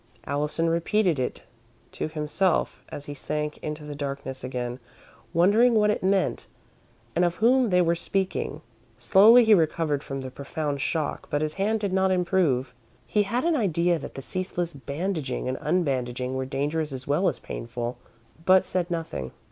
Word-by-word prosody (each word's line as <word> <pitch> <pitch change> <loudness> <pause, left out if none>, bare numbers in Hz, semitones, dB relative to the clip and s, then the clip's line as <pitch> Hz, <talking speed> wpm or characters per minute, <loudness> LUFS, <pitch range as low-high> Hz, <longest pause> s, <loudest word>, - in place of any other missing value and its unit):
Allison 150 +3 -1
repeated 170 0 +1
it 125 - -3 0.5
to - - -3
himself 155 +4 0
as 145 - -7
he 145 - -6
sank 150 +1 -3
into 150 0 -5
the 150 0 -6
darkness 140 -2 -5
again, 125 -1 -4 0.5
wondering 215 +8 +4
what 210 -1 +4
it - - -2
meant 190 0 +1 0.7
and 175 - +3
of 175 -1 +1
whom 245 +3 +4
they 180 -1 +4
were 170 0 +3
speaking. 185 -4 -2 0.4
Slowly 205 - +7
he 220 - +6
recovered 160 -4 +2
from 135 -2 -5
the 130 -1 -6
profound 140 +1 -3
shock, 155 -1 -2
but 145 +1 0
his 155 0 -2
hand 210 +4 0
did 200 -3 -1
not 190 0 +3
improve. 175 -9 +1 0.3
He 210 - +2
had 235 +5 -1
an 340 -1 +3
idea 175 - +1
that - - -8
the 135 - -6
ceaseless 180 0 -3
bandaging 145 0 -3
and 130 0 -2
unbandaging 130 -6 -1
were 130 0 -2
dangerous 150 +3 -1
as 130 -1 -6
well 150 +7 +2
as - - -5
painful, 120 +1 -5 0.4
but 185 +1 +5
said 180 -1 -1
nothing. 165 - -4
160 Hz, 165 wpm, -26 LUFS, 140-190 Hz, 0.7 s, Slowly